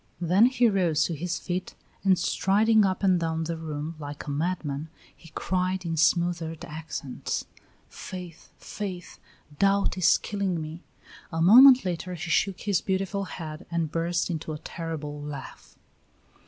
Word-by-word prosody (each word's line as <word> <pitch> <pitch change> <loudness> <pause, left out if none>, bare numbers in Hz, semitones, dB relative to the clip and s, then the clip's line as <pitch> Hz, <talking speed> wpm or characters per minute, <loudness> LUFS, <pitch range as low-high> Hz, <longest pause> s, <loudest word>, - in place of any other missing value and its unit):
Then 180 +7 +5
he 250 -2 +3
rose 175 -7 +2
to 170 - -1
his 170 +3 -3
feet, 180 0 -4 0.3
and 190 -2 +4
striding 210 +4 +3
up 190 +1 -1
and 185 -2 +4
down 165 -1 -1
the 165 +1 -3
room 155 -1 -5
like 145 -1 -7
a 145 - -4
madman, 155 -1 -2 0.3
he 165 - -16
cried 185 0 -1
in 165 -1 -1
smothered 165 0 +1
accents: 150 -4 -5 0.4
"Faith! 180 -3 -9
Faith! 185 -4 -7 0.4
Doubt 200 -1 +2
is 170 - +5
killing 195 -4 -2
me!" 155 +2 -7 0.5
A 165 - -3
moment 250 +8 +8
later 180 0 -3
he 165 0 -6
shook 190 +3 +1
his 200 -5 +1
beautiful 195 +1 -1
head 160 -2 -8
and 165 -3 -1
burst 170 +2 -1
into 160 -1 -4
a - - -5
terrible 150 -2 -6
laugh. 145 -3 -9
170 Hz, 150 wpm, -27 LUFS, 160-190 Hz, 0.5 s, moment